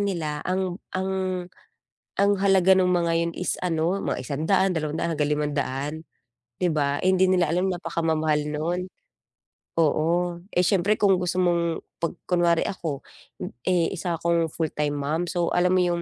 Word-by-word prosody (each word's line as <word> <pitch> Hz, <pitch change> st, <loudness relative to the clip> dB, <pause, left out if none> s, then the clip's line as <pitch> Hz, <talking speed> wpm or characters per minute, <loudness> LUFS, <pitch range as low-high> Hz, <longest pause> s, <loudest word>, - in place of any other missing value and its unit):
nila 165 Hz, -7 st, -2 dB
ang 185 Hz, 0 st, -1 dB, 0.2 s
ang 190 Hz, +1 st, -1 dB, 1.1 s
ang 200 Hz, +1 st, +3 dB
halaga 190 Hz, -1 st, +4 dB
ng 185 Hz, -, +3 dB
mga 175 Hz, -2 st, +2 dB
'yon 170 Hz, 0 st, 0 dB
is 180 Hz, -, -2 dB
ano, 175 Hz, +2 st, 0 dB
mga -, -, -2 dB
P100, 165 Hz, +8 st, +1 dB
P200, 160 Hz, 0 st, -2 dB
hanggang 150 Hz, 0 st, 0 dB
P500, 145 Hz, -1 st, -2 dB, 0.6 s
'di 180 Hz, -, +1 dB
ba? 145 Hz, -2 st, +1 dB
Eh, 185 Hz, -, +4 dB
hindi 185 Hz, 0 st, +4 dB
nila 180 Hz, -3 st, +3 dB
alam 180 Hz, +3 st, +1 dB
napakamamahal 160 Hz, -3 st, 0 dB
nun. 175 Hz, +4 st, -2 dB, 0.9 s
Oo, 170 Hz, +2 st, +1 dB
eh, 180 Hz, -, +1 dB
siyempre 205 Hz, +2 st, +2 dB
kung 195 Hz, -3 st, +3 dB
gusto 180 Hz, 0 st, -1 dB
mong 170 Hz, -2 st, +1 dB, 0.2 s
pag 170 Hz, -, +1 dB, 0.2 s
kunwari 175 Hz, -2 st, +2 dB
ako, 160 Hz, -7 st, -4 dB, 0.6 s
eh, 180 Hz, -1 st, +2 dB
isa 175 Hz, -2 st, -2 dB
akong 170 Hz, -1 st, +1 dB
full-time 150 Hz, -2 st, -2 dB
mom, 155 Hz, +5 st, -1 dB
so 175 Hz, -1 st, 0 dB
alam 180 Hz, +1 st, +3 dB
mo 185 Hz, -, +3 dB
yung, 175 Hz, -1 st, 0 dB
170 Hz, 155 wpm, -25 LUFS, 155-185 Hz, 1.1 s, halaga